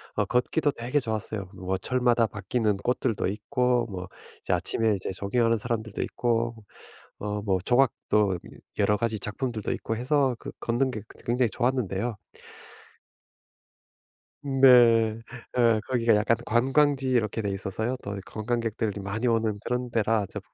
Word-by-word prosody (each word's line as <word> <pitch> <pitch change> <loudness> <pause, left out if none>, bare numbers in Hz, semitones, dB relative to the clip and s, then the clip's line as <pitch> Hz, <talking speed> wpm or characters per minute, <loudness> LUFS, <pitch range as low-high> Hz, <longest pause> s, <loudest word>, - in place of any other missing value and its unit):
어 - - +1
걷기도 140 +4 +1
되게 125 +4 -1
좋았어요. 110 -5 -3
뭐 95 +1 -2
철마다 120 +2 +2
바뀌는 105 +1 -1
꽃들도 120 +1 -1
있고 120 +4 0
뭐 90 -1 -6 0.3
이제 - - -1
아침에 110 -2 +1
이제 95 - -4
조깅하는 115 +4 +1
사람들도 110 -2 -3
있고 115 -1 -1 0.6
어 105 0 -3
뭐 95 -3 +1
조각도 105 -6 +2
여 - - -3 0.4
여러 105 0 +3
가지 110 -2 -1
작품들도 110 +1 -3
있고 115 - -3
해서 130 +1 +1
그 - - -7
걷는 125 +3 0
게 110 - -5
그 - - -16
굉장히 120 0 +2
좋았는데요. 120 -3 -1 2.3
네. 120 -5 +5 0.4
어 115 -3 +4
거기가 120 -3 +3
약간 105 +2 +2
관광지 135 +3 +2
이렇게 115 -3 +1
돼 100 - -2
있어서요. 100 +6 -3
또 100 0 -5
관광객들이 110 -1 -2
많이 105 +5 -2
오는 110 -3 +1
그런 125 0 -1
데라 110 -2 +1
저 - - -6
115 Hz, 305 characters per minute, -27 LUFS, 105-125 Hz, 2.3 s, 네